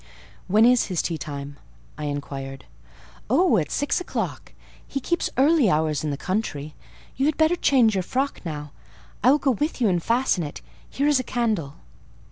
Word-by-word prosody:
"When 215 +4 +5
is 250 0 +4
his 180 -4 -1
tea 165 -2 -2
time?" 140 0 -6 0.4
I 150 - -5
inquired. 140 -2 -5 0.6
"Oh, 270 -1 +4
at 150 -5 -1
six 285 +5 0
o'clock: - - -4 0.3
he 275 - -3
keeps 345 +6 -1
early 280 - +4
hours 155 -3 +1
in 155 - -1
the 140 - -2
country. 155 -7 -3 0.4
You 270 +2 +2
had 305 - 0
better 315 +2 +4
change 255 -9 +4
your 190 - +1
frock 265 +9 -2
now; 150 -4 -6 0.5
I 250 - +6
will 285 - +6
go 280 -2 +1
with 295 +6 -2
you 230 -4 +3
and 175 -2 +1
fasten 230 -4 +1
it. 145 - -7 0.3
Here 280 - -1
is 295 -3 +4
a - - -2
candle." 215 - -1
215 Hz, 180 wpm, -24 LUFS, -, 0.6 s, I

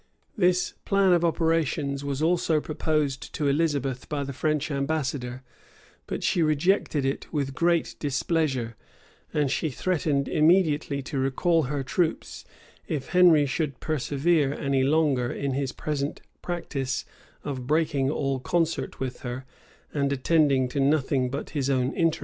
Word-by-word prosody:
This 180 -4 +2
plan 195 -2 +3
of 175 -1 +3
operations 160 -4 0
was 140 +1 -2
also 165 -2 +2
proposed 150 -3 -2
to 150 - 0
Elizabeth 140 -4 0
by 145 -2 -2
the 140 0 -5
French 150 +2 -1
ambassador, 140 -3 -2 0.6
but - - -4
she 175 - +2
rejected 155 -1 +2
it 135 - -3
with 140 -3 -2
great 170 +3 +1
displeasure; 135 -5 -1 0.6
and 145 -3 +1
she 155 - 0
threatened 145 -2 0
immediately 155 -4 +2
to 135 +1 -3
recall 150 +5 +2
her 145 -1 -2
troops, 160 +5 -2 0.4
if 145 -4 -3
Henry 175 -5 +6
should 140 -1 -2
persevere 145 0 +1
any 140 -1 0
longer 135 -3 +2
in 140 -1 -2
his 135 -1 -1
present 145 -1 -3 0.2
practice 140 -7 -3 0.4
of 130 -4 -5
breaking 145 -3 +1
all 135 -2 -1
concert 165 +3 -1
with 130 -2 -4
her, 125 0 -6 0.5
and 140 -1 0
attending 140 -1 +3
to 140 - -3
nothing 135 -2 +2
but 140 +3 -5
his 140 -3 -1
own 130 0 +1
interests. 165 -1 +1
145 Hz, 140 wpm, -26 LUFS, 135-160 Hz, 0.6 s, Henry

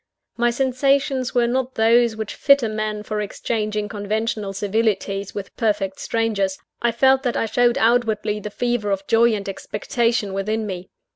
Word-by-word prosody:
My 240 +1 +2
sensations 265 +1 +1
were 240 -1 +4
not 255 +2 -1
those 230 +1 +4
which 220 -1 -5
fit 280 -2 +4
a - - +1
man 215 -1 -3
for 210 0 -3
exchanging 210 0 -2
conventional 210 0 -2
civilities 200 -1 -1
with 195 -2 -6
perfect 205 -4 0
strangers; 205 -4 -1 0.2
I 235 - +2
felt 265 +3 +4
that 245 -3 -1
I - - +1
showed 240 +3 +2
outwardly 220 -3 +1
the 210 - -6
fever 240 -1 -1
of 195 0 -1
joy 230 +1 +4
and 200 -1 -5
expectation 210 +1 -1
within 215 +3 -1
me. 185 -2 -6
220 Hz, 160 wpm, -22 LUFS, 205-240 Hz, 0.2 s, were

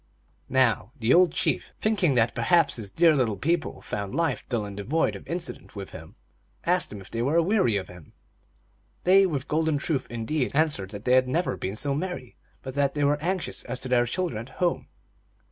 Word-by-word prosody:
Now 125 -3 +2
the 120 0 +2
old 180 -1 +6
chief, - - -1
thinking 200 -10 +2
that 115 -1 +3
perhaps 175 -6 +3
his 105 -4 -5
dear 165 - +4
little 115 -7 +1
people 165 - -1
found 100 +2 -4
life 165 -5 0
dull 115 -4 -1
and 100 -1 -7
devoid 120 +12 0
of - - -11
incident 170 -7 -5
with 100 -1 -7
him, 80 0 -11 0.5
asked - - +1
them 105 -1 -8
if 95 - -14
they 115 - -2
were 140 +6 +1
aweary 170 - +3
of 95 - -4
him. 90 -4 -14 0.9
They, 190 +2 +6
with 140 -6 -3
golden 160 -1 +1
truth 140 -1 -1
indeed, 120 +4 -1
answered 145 -11 +1
that 105 +1 -9
they 125 - +3
had 130 0 +5
never 165 +7 0
been 95 +2 -4
so 140 +5 +1
merry, 160 -5 -4 0.3
but 130 - -6
that 140 0 +1
they 145 - 0
were 145 +1 +2
anxious 185 +2 -2
as 125 +1 -4
to 130 - -4
their 120 -1 +3
children 170 -5 -2
at 130 - -16
home. 175 -2 0
135 Hz, 200 wpm, -26 LUFS, 115-165 Hz, 0.9 s, old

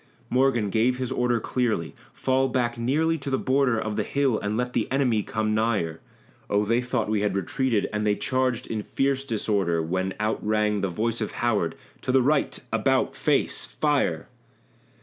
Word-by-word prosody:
Morgan 125 -5 +2
gave 120 +4 +2
his 130 -1 -3
order 120 -1 +1
clearly 110 -9 -1 0.2
"Fall 130 0 +1
back 120 -2 0
nearly 155 +7 +1
to 140 - -5
the 135 - +1
border 130 -4 +2
Of 110 -1 -3
the 105 - +1
hill 135 -1 +1
and 105 +1 -2
let 125 0 -2
the - - -1
enemy 130 -5 +2
come 110 +1 -1
nigher!" 105 -8 0 0.5
Oh! 105 +1 +2
they 115 +3 +2
thought 125 0 -1
we 105 -1 0
had 105 -2 0
retreated, 105 +3 0
and 105 0 -1
they 105 -1 +2
charged 130 +1 0
in 110 -2 -3
fierce 135 +4 0
disorder, 100 -8 0
When 95 +4 -2
out 110 +1 -1
rang 105 -1 +1
the 100 - 0
voice 115 +6 -2
of 110 - -3
Howard 105 -9 0 0.3
"To - - -1
the 130 -1 +4
right 140 +2 +1 0.2
about, - - +1
face! - - +1
Fire!" - - 0
115 Hz, 180 wpm, -25 LUFS, 105-130 Hz, 0.5 s, the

